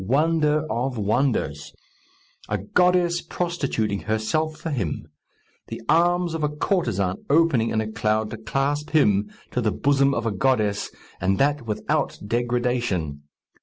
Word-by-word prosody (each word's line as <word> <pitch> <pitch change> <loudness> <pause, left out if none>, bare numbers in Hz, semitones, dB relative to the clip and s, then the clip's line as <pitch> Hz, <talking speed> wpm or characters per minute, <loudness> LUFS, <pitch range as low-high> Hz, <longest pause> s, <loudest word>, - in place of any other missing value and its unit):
Wonder 150 +3 +2
of 125 +1 -2
wonders! 105 - 0 0.8
A 105 - 0
goddess 175 - +2
prostituting 140 - -2
herself 115 +9 -1
for 165 0 -4
him! 95 - -2 0.6
The - - -6
arms 175 +2 +3
of 165 - -3
a 150 - +2
courtesan 120 - 0
opening 140 -7 +3
in 110 - 0
a 110 0 -4
cloud 110 0 0
to - - -5
clasp 140 +6 -1
him 105 -7 +3 0.2
to 125 - 0
the 110 -2 +1
bosom 140 +2 +2
of 115 - -2
a 115 - +1
goddess, 105 -2 +1 0.3
and 95 +2 +2
that 145 -3 +1
without 105 - -1
degradation! 120 - -1
125 Hz, 135 wpm, -24 LUFS, 110-150 Hz, 0.8 s, arms